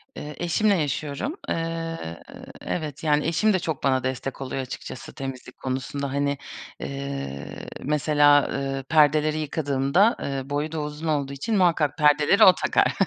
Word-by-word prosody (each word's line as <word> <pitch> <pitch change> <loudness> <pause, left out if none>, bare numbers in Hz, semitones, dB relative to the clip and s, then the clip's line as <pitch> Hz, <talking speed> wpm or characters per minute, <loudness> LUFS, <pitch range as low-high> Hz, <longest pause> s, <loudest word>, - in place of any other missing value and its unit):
Iıı, 150 0 -7
eşimle 200 +4 +2
yaşıyorum, 150 - -2
ııı, 165 - -3 0.4
evet, 150 -4 -4
yani 150 -1 +2
eşim 210 +6 +2
de 185 - +2
çok 160 -4 -4
bana 130 -2 +2
destek 130 +1 -3
oluyor 135 0 -3
açıkçası 130 0 -8
temizlik 130 -2 -7
konusunda. 135 +1 -3
Hani, 140 0 0 0.5
ııı, 140 - -5 0.4
mesela, 145 0 +4
ııı, 135 -1 -2
perdeleri 155 +1 +3
yıkadığımda, 150 - +2
ııı, 135 -1 -4
boyu 145 +2 -1
da 160 - -3
uzun 150 +2 -5
olduğu 140 -3 0
için 210 - -1
muhakkak 165 -6 +2
perdeleri 150 +7 +5
o 185 - +9
takar. - - +2
145 Hz, 140 wpm, -25 LUFS, 135-160 Hz, 0.5 s, o